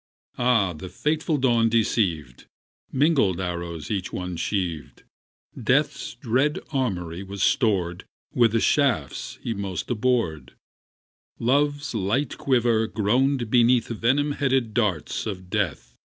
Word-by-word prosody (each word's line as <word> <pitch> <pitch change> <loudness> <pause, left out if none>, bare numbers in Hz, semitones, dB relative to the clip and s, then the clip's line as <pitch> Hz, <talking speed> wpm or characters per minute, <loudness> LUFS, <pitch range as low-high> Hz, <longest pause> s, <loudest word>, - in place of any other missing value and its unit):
Ah, 115 -7 +3
the 85 +4 -8
fateful 155 - -1
dawn 120 -4 +3
deceived! 95 - 0 0.4
Mingled 130 - +2
arrows 85 -3 -4
each 95 -3 -2
one 90 -1 -4
sheaved; 85 -4 -3 0.5
Death's - - 0
dread 130 +6 +1
armoury 95 - -2
was 100 0 -4
stored 95 -8 +1 0.3
With 115 -3 +3
the 115 - +3
shafts 115 - 0
he 115 - -2
most 100 -2 -4
abhorred; 105 - 0 0.8
Love's 145 +3 +1
light 115 +6 -1
quiver 120 -4 +2
groaned 120 +3 +1
beneath 120 -1 +4
Venom 130 +6 +1
headed 135 -5 0
darts 105 -6 -1
of 95 -3 -6
Death. 75 - -2
110 Hz, 115 wpm, -24 LUFS, 90-130 Hz, 0.8 s, beneath